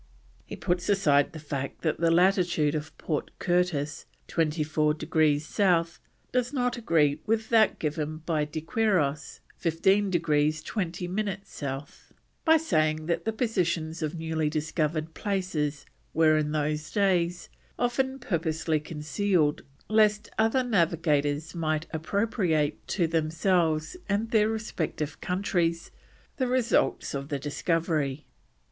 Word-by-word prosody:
He - - -6
puts 175 +2 -1
aside 150 -8 +3
the 165 - -9
fact 140 -3 -5
that 155 - 0
the 165 0 +3
latitude 175 -3 +3
of 155 0 -5
Port 155 -3 -2
Curtis, 175 -5 0 0.2
24 155 -1 +1
degrees 155 -1 +1
South, 170 -2 +1 0.3
does 250 0 0
not 245 -3 0
agree 155 - +2
with 220 0 0
that 220 -2 +4
given 155 0 -2
by 155 -3 +1
De 155 +1 -5
Quiros, 160 -7 0 0.2
15 190 +5 +2
degrees 155 -3 +1
20 180 -1 -3
minutes 200 +1 -3
South, 140 +3 -7 0.3
by 320 0 +6
saying 155 - +1
that 170 +1 -1
the 225 - +1
positions 175 -8 -1
of 155 +1 -2
newly 160 -1 -1
discovered 155 +1 -1
places 170 -8 -2 0.3
were, 155 -1 +5
in 150 -1 0
those 150 0 -1
days, 180 -4 +1 0.3
"often 260 +2 0
purposely 160 - -1
concealed 155 +1 0 0.3
lest 215 -1 +3
other 225 +4 +2
navigators 160 - +1
might 155 -2 -1
appropriate 165 -3 0
to 175 - +1
themselves 160 - +1
and 210 +3 0
their 215 -1 +4
respective 165 -9 -3
countries, 175 -3 -1 0.5
the 260 - 0
results 250 -2 +1
of 140 0 -4
the 145 - -1
discovery." 150 -1 -1
165 Hz, 125 wpm, -27 LUFS, 155-195 Hz, 0.5 s, by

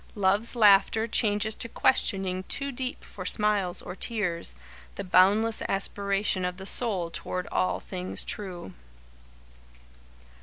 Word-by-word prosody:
Love's 205 +4 +1
laughter 215 0 +4
changes 215 -1 +1
to 230 - -4
questioning 190 -7 +1
too 280 0 -1
deep 255 0 -5
for 185 - -9
smiles 200 -2 +1
or - - -7
tears 180 - -2 0.4
the - - -5
boundless 200 +5 +3
aspiration 195 0 0
of 180 0 -3
the 190 - -9
soul 195 -7 +1
toward 180 0 -5
all 185 - 0
things 185 -1 -3
true. 180 - -6
200 Hz, 120 wpm, -27 LUFS, 185-220 Hz, 0.4 s, laughter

